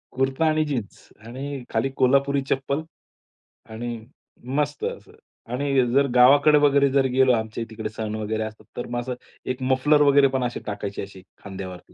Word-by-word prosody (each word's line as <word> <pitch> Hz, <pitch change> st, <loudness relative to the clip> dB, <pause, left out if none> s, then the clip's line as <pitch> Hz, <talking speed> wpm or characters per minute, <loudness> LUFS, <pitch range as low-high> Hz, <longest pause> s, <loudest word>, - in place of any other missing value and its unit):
कुर्ता 135 Hz, +4 st, 0 dB
आणि 155 Hz, 0 st, +2 dB
जीन्स 125 Hz, -9 st, -5 dB, 0.2 s
आणि 135 Hz, +2 st, -6 dB
खाली 120 Hz, +4 st, 0 dB
कोल्हापुरी 140 Hz, +2 st, +3 dB
चप्पल, 140 Hz, +3 st, -1 dB, 0.9 s
आणि 120 Hz, +2 st, -5 dB, 0.6 s
मस्त 145 Hz, -1 st, -1 dB
असं -, -, -6 dB, 0.4 s
आणि 135 Hz, -1 st, +1 dB
जर 140 Hz, 0 st, +4 dB
गावाकडे 145 Hz, +4 st, +6 dB
वगैरे 140 Hz, -1 st, +4 dB
जर 135 Hz, -1 st, +3 dB
गेलो 130 Hz, -1 st, +4 dB
आमच्या 110 Hz, 0 st, -2 dB
तिकडे 110 Hz, -1 st, -5 dB
सण 110 Hz, 0 st, -5 dB
वगैरे 110 Hz, 0 st, -2 dB
असतात, 110 Hz, 0 st, -9 dB
तर 120 Hz, -, -4 dB
मग 120 Hz, 0 st, -2 dB
असं 125 Hz, +1 st, -4 dB, 0.4 s
एक 130 Hz, -, -6 dB
मफलर 135 Hz, +3 st, +3 dB
वगैरे 140 Hz, -1 st, +6 dB
पण 130 Hz, -, 0 dB
असे 120 Hz, 0 st, -3 dB
टाकायची 105 Hz, -1 st, -4 dB
अशी 100 Hz, -1 st, -10 dB, 0.2 s
खांद्यावरती. 95 Hz, -2 st, -9 dB
130 Hz, 160 wpm, -24 LUFS, 110-140 Hz, 0.9 s, गावाकडे